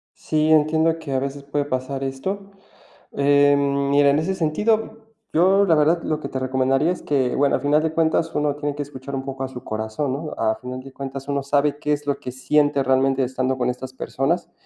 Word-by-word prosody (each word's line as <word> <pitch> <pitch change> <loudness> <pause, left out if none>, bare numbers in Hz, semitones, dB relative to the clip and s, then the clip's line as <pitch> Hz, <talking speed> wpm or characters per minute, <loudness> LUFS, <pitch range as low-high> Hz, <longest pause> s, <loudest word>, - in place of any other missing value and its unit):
Sí, 155 0 0
entiendo 160 +1 +3
que 150 -4 -7
a 130 - +1
veces 140 +1 -5
puede 145 0 -1
pasar 135 0 -3
esto. 190 +10 -4 0.6
Eh, 145 0 +4
mira, 140 0 +3
en 145 - +2
ese 190 +5 -1
sentido, 220 +7 0 0.3
yo, 190 +5 +4
la 170 -5 +4
verdad, 160 +3 +3
lo 155 -1 -1
que - - -5
te 130 - -4
recomendaría 130 +4 +1
es 180 - -4
que, 135 -4 0
bueno, 140 0 +2
al - - +1
final 150 +2 +2
de 160 -1 -1
cuentas, 160 0 +1
uno 150 -1 0
tiene 145 -1 -3
que 145 - -4
escuchar 140 -1 -8
un 135 0 -3
poco 135 0 -5
a - - -3
su 125 -1 -9
corazón, 110 +5 -3
¿no? 150 +3 -4
A 110 -1 +1
final 125 0 -7
de 135 0 -12
cuentas 135 0 -7
uno 140 -1 -1
sabe 145 +1 +1
qué 150 0 -1
es 145 0 -2
lo 140 - 0
que 125 - -7
siente 145 +1 +2
realmente 130 +1 +2
estando 130 +1 -1
con 125 - +1
estas 130 +1 -7
personas. 140 +6 -2
140 Hz, 215 wpm, -22 LUFS, 135-155 Hz, 0.6 s, Eh